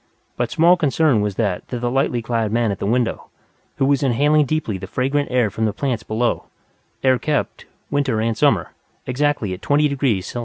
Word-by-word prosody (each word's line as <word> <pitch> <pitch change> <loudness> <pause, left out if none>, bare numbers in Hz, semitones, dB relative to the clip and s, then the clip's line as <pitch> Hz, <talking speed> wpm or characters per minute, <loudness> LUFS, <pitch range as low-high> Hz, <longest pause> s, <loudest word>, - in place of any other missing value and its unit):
But - - -1
small 175 +3 +4
concern 150 -6 +2
was 105 -2 -2
that 100 -5 -2
to 125 - -4
the 120 0 -2
lightly 125 -3 0
clad 115 -2 -1
man 115 -1 +1
at 100 - -5
the - - -2
window, 120 +1 -1 0.5
who 135 - +1
was 140 -1 +2
inhaling 145 +3 +3
deeply 125 -11 -2
the 95 - -7
fragrant 135 +7 -1
air 125 -5 +1
from 110 +3 -1
the 105 - 0
plants 125 -1 -2
below 115 +2 -1 0.6
air 130 -2 +3
kept, 150 -2 -2 0.2
winter 140 -6 0
and 115 0 0
summer, - - +2 0.3
exactly 130 -6 0
at 90 - -8
20° 140 -8 +1
C. 120 - -6
125 Hz, 190 wpm, -20 LUFS, 110-145 Hz, 0.6 s, small